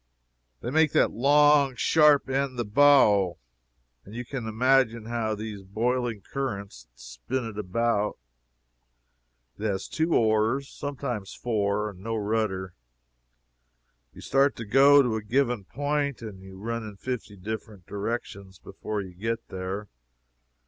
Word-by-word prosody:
They -, -, -4 dB
make 155 Hz, 0 st, +3 dB
that -, -, +3 dB
long 145 Hz, +2 st, +4 dB
sharp 150 Hz, +3 st, +4 dB
end 135 Hz, -1 st, -1 dB
the 120 Hz, -, -1 dB
bow, 105 Hz, -, +5 dB, 0.7 s
and 100 Hz, -, -12 dB
you 125 Hz, +1 st, -5 dB
can 120 Hz, -2 st, -5 dB
imagine 115 Hz, 0 st, +2 dB
how 115 Hz, -2 st, -2 dB
these 105 Hz, -1 st, -6 dB
boiling 115 Hz, +3 st, -1 dB
currents 100 Hz, -, -5 dB
spin -, -, -5 dB
it 105 Hz, -2 st, -7 dB
about. 105 Hz, +1 st, 0 dB, 1.4 s
It -, -, -7 dB
has 100 Hz, -2 st, -2 dB
two 160 Hz, +1 st, 0 dB
oars, 110 Hz, +3 st, +2 dB
and -, -, -16 dB
sometimes 125 Hz, -8 st, -5 dB
four, 105 Hz, -2 st, -1 dB
and 90 Hz, -, -15 dB
no 115 Hz, +4 st, -4 dB
rudder. 105 Hz, -3 st, -1 dB, 1.4 s
You -, -, -13 dB
start 140 Hz, +1 st, +2 dB
to 115 Hz, -, -7 dB
go 140 Hz, +5 st, +6 dB
to 115 Hz, -3 st, 0 dB
a -, -, -4 dB
given 120 Hz, -1 st, 0 dB
point 145 Hz, +1 st, -2 dB
and 100 Hz, -4 st, -8 dB
you 95 Hz, 0 st, -12 dB
run 115 Hz, +3 st, -3 dB
in 105 Hz, -2 st, -8 dB
fifty 125 Hz, -3 st, -5 dB
different 105 Hz, -1 st, -7 dB
directions 100 Hz, -2 st, -5 dB
before 105 Hz, -1 st, -5 dB
you 95 Hz, -2 st, -11 dB
get 115 Hz, +5 st, -4 dB
there. 95 Hz, +2 st, -5 dB
110 Hz, 140 wpm, -26 LUFS, 100-130 Hz, 1.4 s, go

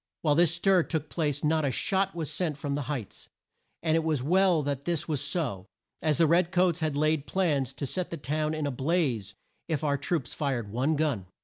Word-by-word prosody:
While 150 Hz, -3 st, +4 dB
this 170 Hz, +2 st, +4 dB
stir 185 Hz, +1 st, +4 dB
took 160 Hz, -2 st, -3 dB
place 145 Hz, -4 st, -1 dB
not 155 Hz, +1 st, +2 dB
a 140 Hz, -, +2 dB
shot 190 Hz, +9 st, 0 dB
was 160 Hz, -3 st, -4 dB
sent 160 Hz, -6 st, -1 dB
from 145 Hz, -1 st, -3 dB
the 140 Hz, -3 st, -3 dB
Heights, 130 Hz, -9 st, -5 dB, 0.5 s
and 160 Hz, -1 st, +2 dB
it 165 Hz, -, +2 dB
was 155 Hz, -5 st, 0 dB
well 180 Hz, 0 st, +3 dB
that 140 Hz, -1 st, -3 dB
this 170 Hz, -2 st, -1 dB
was 150 Hz, -4 st, -1 dB
so, 140 Hz, -, -2 dB, 0.3 s
as 155 Hz, -2 st, +1 dB
the 165 Hz, -, +5 dB
red 170 Hz, +2 st, +3 dB
coats 180 Hz, -2 st, +2 dB
had 155 Hz, -3 st, -1 dB
laid 155 Hz, 0 st, +1 dB
plans 150 Hz, -9 st, +1 dB
to 140 Hz, -, -3 dB
set 180 Hz, +6 st, -3 dB
the 170 Hz, -, -5 dB
town 155 Hz, +2 st, -1 dB
in 155 Hz, -1 st, -2 dB
a 145 Hz, -, -1 dB
blaze 130 Hz, -, 0 dB, 0.3 s
if 160 Hz, -2 st, -1 dB
our 140 Hz, -2 st, +1 dB
troops 145 Hz, -2 st, -2 dB
fired 125 Hz, -8 st, -2 dB
one 130 Hz, +8 st, +1 dB
gun. 145 Hz, -11 st, -1 dB
155 Hz, 215 wpm, -28 LUFS, 140-170 Hz, 0.5 s, the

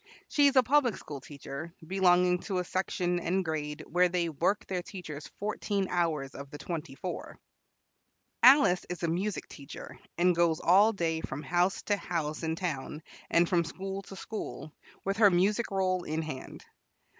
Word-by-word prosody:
She 290 Hz, -1 st, +5 dB
is 280 Hz, -, +2 dB
a 260 Hz, -, +7 dB
public 255 Hz, -2 st, +3 dB
school 145 Hz, -3 st, -8 dB
teacher, 145 Hz, +4 st, -8 dB
belonging 180 Hz, 0 st, +3 dB
to 195 Hz, -3 st, -2 dB
a 180 Hz, -, +1 dB
section 180 Hz, -1 st, -1 dB
and 185 Hz, +2 st, 0 dB
grade 150 Hz, -2 st, -3 dB
where 180 Hz, +2 st, +3 dB
they 175 Hz, -1 st, 0 dB
work 170 Hz, +7 st, 0 dB
their 185 Hz, -2 st, -2 dB
teachers 160 Hz, -6 st, -8 dB
fourteen 205 Hz, -1 st, -1 dB
hours 160 Hz, -6 st, 0 dB
of 140 Hz, 0 st, -8 dB
the 145 Hz, -, -8 dB
twenty 160 Hz, -4 st, -5 dB
four. 180 Hz, +5 st, -6 dB, 1.0 s
Alice 260 Hz, -9 st, +7 dB
is 180 Hz, -1 st, -5 dB
a -, -, +2 dB
music 185 Hz, +5 st, -2 dB
teacher, 140 Hz, -1 st, -10 dB, 0.2 s
and 175 Hz, +1 st, +4 dB
goes 170 Hz, -2 st, +2 dB
all 200 Hz, +6 st, +5 dB
day 165 Hz, -5 st, -1 dB
from 145 Hz, -1 st, -5 dB
house 175 Hz, +5 st, +1 dB
to 205 Hz, -, +1 dB
house 155 Hz, -5 st, -3 dB
in 160 Hz, -1 st, -1 dB
town, 155 Hz, -3 st, -4 dB, 0.3 s
and 170 Hz, +1 st, +4 dB
from 175 Hz, -2 st, +2 dB
school 195 Hz, +3 st, -5 dB
to 195 Hz, -, -11 dB
school, 185 Hz, -7 st, -6 dB, 0.3 s
with 195 Hz, +1 st, 0 dB
her 215 Hz, -2 st, +7 dB
music 200 Hz, +6 st, +2 dB
roll 185 Hz, -2 st, 0 dB
in 160 Hz, 0 st, -2 dB
hand. 155 Hz, -4 st, -8 dB
175 Hz, 170 wpm, -30 LUFS, 160-195 Hz, 1.0 s, a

